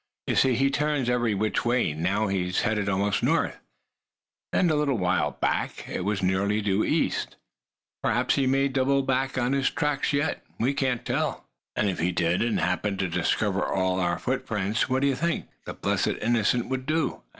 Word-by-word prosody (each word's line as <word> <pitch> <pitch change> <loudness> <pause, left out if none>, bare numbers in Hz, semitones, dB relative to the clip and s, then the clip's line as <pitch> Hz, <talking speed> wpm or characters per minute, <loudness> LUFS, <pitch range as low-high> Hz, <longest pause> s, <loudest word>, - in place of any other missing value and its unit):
You - - -1
see, 130 -2 +4
he 135 +3 +2
turns 145 -4 0
every 120 -3 +1
which 105 +2 0
way. 120 -9 +1
Now 95 +7 0
he's 95 -2 0
heading 105 -2 0
almost 100 0 +1
north; - - +1 0.9
and 180 -4 +3
a - - +2
little 145 -4 +1
while 90 -1 +1
back - - -1
it - - -3
was 100 0 -1
nearly 100 +3 +1
due 100 0 +1
east. - - 0 0.7
Perhaps - - +1
he 135 -2 +1
may 135 +1 +3
double 135 0 +1
on 130 -1 0
his 140 -1 +2
tracks 150 -1 -1
yet; 145 +1 -1 0.2
we 125 +5 +1
can't 130 -3 -1
tell." - - -1 0.3
"And 105 - +1
if 95 - -2
he 90 +2 +1
did, 85 0 +1
and 115 -1 +1
happened 95 +2 0
to 95 - 0
discover 95 +3 0
all 95 -1 0
our 85 -1 0
footprints, 110 -4 -1
what 130 +1 +1
d'ye 140 -1 +3
think 170 +6 -1 0.2
the - - -5
blessed - - 0
innocent 120 +1 +1
would 130 0 -3
do?" 160 +1 0
115 Hz, 180 wpm, -26 LUFS, 95-135 Hz, 0.9 s, see